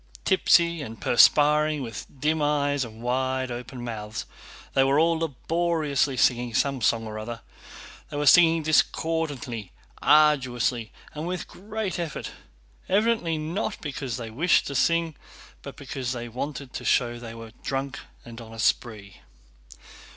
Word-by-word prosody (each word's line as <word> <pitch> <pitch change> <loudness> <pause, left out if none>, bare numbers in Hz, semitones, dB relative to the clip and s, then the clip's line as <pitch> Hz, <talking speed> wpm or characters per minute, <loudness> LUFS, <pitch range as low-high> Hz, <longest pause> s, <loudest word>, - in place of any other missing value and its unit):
Tipsy 170 -3 +3
and 115 -5 -8
perspiring, 150 +3 +4
with 115 -3 -7
dim 155 +3 +1
eyes 145 -1 +1
and 115 -1 -10
wide 130 +1 -1
open 120 0 -7
mouths, 110 -2 -5 0.5
they 135 - +4
were 135 +1 +3
all 165 0 +3
laboriously 155 -2 0
singing 120 -1 +2
some 140 -3 +1
song 115 +1 +2
or 110 0 -6
other. 115 +1 -6 0.7
They - - -5
were 145 - 0
singing 165 +2 +6
discordantly, 150 - 0 0.3
arduously, 125 -6 +3 0.2
and 155 +2 -5
with 180 0 -4
great 210 -1 -5
effort, 165 -5 -4 0.6
evidently 200 -5 +2
not 170 +8 -3
because 135 -5 -4
they 115 -2 -7
wished 160 +10 +3
to 140 - -4
sing, 165 +4 +1 0.5
but - - -9
because 130 -2 -4
they 120 -1 -5
wanted 130 +2 -6
to - - -5
show 120 -2 +1
they 115 -1 -8
were 115 -1 -10
drunk 135 0 -3 0.3
and 115 0 -10
on 115 -1 -11
a - - -10
spree. 105 -5 -1
135 Hz, 145 wpm, -25 LUFS, 120-160 Hz, 0.7 s, singing